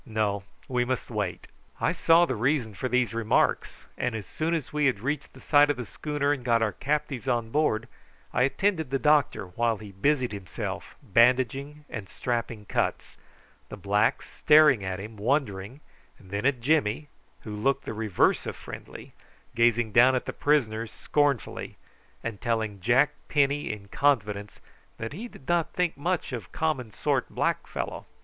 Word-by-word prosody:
"No; 110 Hz, -4 st, -1 dB, 0.3 s
we 125 Hz, -1 st, +1 dB
must 125 Hz, 0 st, -3 dB
wait." 105 Hz, -5 st, -3 dB, 0.3 s
I -, -, +2 dB
saw 165 Hz, +1 st, +5 dB
the 145 Hz, -, -2 dB
reason 120 Hz, -1 st, 0 dB
for 130 Hz, +6 st, -3 dB
these 125 Hz, -1 st, +1 dB
remarks; 115 Hz, -1 st, 0 dB
and 125 Hz, -2 st, -2 dB
as 105 Hz, -3 st, -5 dB
soon 165 Hz, -, -1 dB
as 155 Hz, -3 st, -4 dB
we 150 Hz, -1 st, +3 dB
had 120 Hz, -7 st, 0 dB
reached 145 Hz, +4 st, -3 dB
the -, -, -14 dB
side 145 Hz, -1 st, +5 dB
of 145 Hz, -, +1 dB
the 125 Hz, -, -4 dB
schooner 145 Hz, +3 st, -1 dB
and 135 Hz, -4 st, -5 dB
got 115 Hz, -2 st, +3 dB
our 110 Hz, -, +1 dB
captives 140 Hz, 0 st, -2 dB
on 120 Hz, -3 st, 0 dB
board 120 Hz, -6 st, +1 dB, 0.5 s
I 125 Hz, -, +2 dB
attended 160 Hz, +3 st, +1 dB
the 135 Hz, -, +1 dB
doctor 145 Hz, -9 st, +2 dB
while 115 Hz, +4 st, 0 dB
he 105 Hz, -1 st, -10 dB
busied 130 Hz, +5 st, +1 dB
himself 100 Hz, -4 st, -6 dB
bandaging 130 Hz, +7 st, +2 dB
and 105 Hz, -4 st, -7 dB
strapping 115 Hz, -3 st, -3 dB
cuts, -, -, -2 dB, 0.5 s
the -, -, -7 dB
blacks -, -, +1 dB
staring 150 Hz, -8 st, +5 dB
at 95 Hz, 0 st, -3 dB
him 105 Hz, +2 st, -8 dB
wondering, 115 Hz, 0 st, -1 dB, 0.4 s
and 95 Hz, -2 st, -17 dB
then 100 Hz, +5 st, 0 dB
at 135 Hz, -4 st, 0 dB
Jimmy, 145 Hz, -1 st, +1 dB, 0.3 s
who 105 Hz, -1 st, -7 dB
looked 135 Hz, +6 st, 0 dB
the -, -, -4 dB
reverse 110 Hz, -4 st, +1 dB
of -, -, -4 dB
friendly, -, -, -10 dB, 0.4 s
gazing 115 Hz, -1 st, +3 dB
down 125 Hz, +4 st, +6 dB
at 125 Hz, -, -1 dB
the -, -, -4 dB
prisoners 115 Hz, -7 st, +1 dB
scornfully, 145 Hz, -5 st, -1 dB, 0.5 s
and 115 Hz, -4 st, -5 dB
telling 110 Hz, -3 st, -1 dB
Jack 125 Hz, +8 st, +4 dB, 0.2 s
Penny 145 Hz, -2 st, +1 dB
in 100 Hz, -2 st, -8 dB
confidence 105 Hz, -8 st, 0 dB, 0.4 s
that 115 Hz, +3 st, -5 dB
he 215 Hz, +9 st, -6 dB
did 135 Hz, -, -16 dB
not 175 Hz, -2 st, +1 dB
think 180 Hz, -2 st, 0 dB
much 170 Hz, -1 st, -2 dB
of 110 Hz, -7 st, -6 dB
common 150 Hz, -7 st, -1 dB
sort 105 Hz, -, -1 dB
black -, -, -1 dB
fellow. -, -, -5 dB
125 Hz, 170 wpm, -27 LUFS, 110-145 Hz, 0.5 s, down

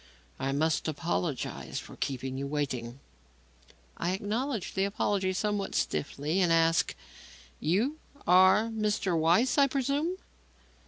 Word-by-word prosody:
"I 135 Hz, +1 st, -1 dB
must 155 Hz, +4 st, +1 dB
apologize 155 Hz, -1 st, -3 dB
for -, -, -7 dB
keeping 130 Hz, -1 st, -3 dB
you 140 Hz, +1 st, -3 dB
waiting." 130 Hz, -4 st, -3 dB, 1.0 s
I 175 Hz, +2 st, -1 dB
acknowledged 220 Hz, +3 st, -2 dB
the 190 Hz, -, +1 dB
apology 200 Hz, -1 st, 0 dB
somewhat 205 Hz, +1 st, -1 dB
stiffly 150 Hz, +6 st, -1 dB
and 175 Hz, -2 st, +3 dB
asked: 165 Hz, 0 st, +3 dB, 0.6 s
"You 230 Hz, -, 0 dB, 0.3 s
are 185 Hz, +5 st, +5 dB
Mr. 210 Hz, -5 st, 0 dB
Weiss, 175 Hz, -, +3 dB
I 280 Hz, -, +6 dB
presume?" 280 Hz, +6 st, -1 dB
185 Hz, 115 wpm, -29 LUFS, 150-215 Hz, 1.0 s, I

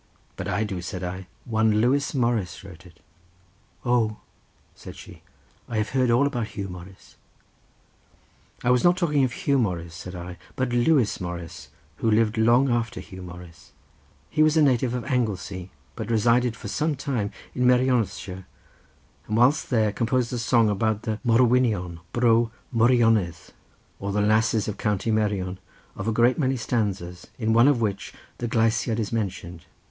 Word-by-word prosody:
"But -, -, -5 dB
I 100 Hz, +4 st, 0 dB
do," 95 Hz, -4 st, -4 dB
said 90 Hz, +1 st, -6 dB
I; 90 Hz, +1 st, -5 dB, 0.2 s
"one 110 Hz, -2 st, +2 dB
Lewis 140 Hz, +6 st, +1 dB
Morris 115 Hz, -9 st, -1 dB
wrote 90 Hz, -2 st, -12 dB
it." 80 Hz, -1 st, -20 dB, 0.9 s
"Oh," 115 Hz, -3 st, +1 dB, 0.6 s
said -, -, -11 dB
she, -, -, -13 dB, 0.5 s
"I 115 Hz, -, -2 dB
have 105 Hz, 0 st, 0 dB
heard 130 Hz, -2 st, +1 dB
all 120 Hz, +4 st, +4 dB
about 120 Hz, -6 st, -2 dB
Huw 100 Hz, -2 st, -3 dB
Morris." 90 Hz, +1 st, -12 dB, 1.5 s
"I 125 Hz, -, +3 dB
was 125 Hz, -1 st, +3 dB
not 175 Hz, +1 st, +4 dB
talking 150 Hz, -6 st, +2 dB
of 130 Hz, -, +1 dB
Huw 140 Hz, +2 st, 0 dB
Morris," 85 Hz, -7 st, -2 dB
said 90 Hz, +2 st, -8 dB
I, 90 Hz, 0 st, -8 dB, 0.2 s
"but 130 Hz, -2 st, -1 dB
Lewis 120 Hz, -3 st, +2 dB
Morris, 85 Hz, -1 st, -7 dB, 0.3 s
who 115 Hz, -, 0 dB
lived 110 Hz, +1 st, +2 dB
long 120 Hz, +4 st, +4 dB
after 120 Hz, -3 st, -1 dB
Huw 95 Hz, -1 st, -10 dB
Morris. 85 Hz, -4 st, -12 dB, 0.5 s
He 155 Hz, -, 0 dB
was 155 Hz, +1 st, +4 dB
a 155 Hz, -, +5 dB
native 125 Hz, -3 st, +2 dB
of 125 Hz, -, -4 dB
Anglesea, 100 Hz, -8 st, -2 dB, 0.3 s
but -, -, -5 dB
resided 115 Hz, +1 st, +2 dB
for 110 Hz, -, -8 dB
some 150 Hz, +8 st, -1 dB
time 125 Hz, -7 st, -2 dB, 0.2 s
in 125 Hz, 0 st, +1 dB
Merionethshire, 125 Hz, -7 st, +1 dB, 0.8 s
and 110 Hz, -, -1 dB
whilst 130 Hz, +6 st, +3 dB
there 110 Hz, -4 st, +2 dB
composed 120 Hz, +3 st, 0 dB
a 120 Hz, -, -2 dB
song 115 Hz, -1 st, +3 dB
about 110 Hz, +1 st, 0 dB
the 110 Hz, -1 st, -3 dB
Morwynion 115 Hz, -7 st, +2 dB
bro 115 Hz, 0 st, +3 dB, 0.2 s
Meirionydd, 115 Hz, -6 st, +3 dB, 0.6 s
or 100 Hz, +1 st, -3 dB
the 105 Hz, +1 st, +1 dB
lasses 110 Hz, +1 st, +2 dB
of 105 Hz, -1 st, -4 dB
County 105 Hz, +1 st, -1 dB
Merion, 100 Hz, -4 st, -1 dB, 0.4 s
of 95 Hz, -, -5 dB
a -, -, +2 dB
great 120 Hz, +5 st, +3 dB
many 135 Hz, -2 st, +1 dB
stanzas, 100 Hz, -7 st, -3 dB
in 110 Hz, -2 st, 0 dB
one 115 Hz, +3 st, +6 dB
of 140 Hz, -5 st, +3 dB
which 100 Hz, -3 st, -3 dB, 0.2 s
the 120 Hz, -, -2 dB
gleisiad 115 Hz, 0 st, +1 dB
is 110 Hz, -, -2 dB
mentioned. 95 Hz, -6 st, -4 dB
110 Hz, 165 wpm, -25 LUFS, 95-125 Hz, 1.5 s, one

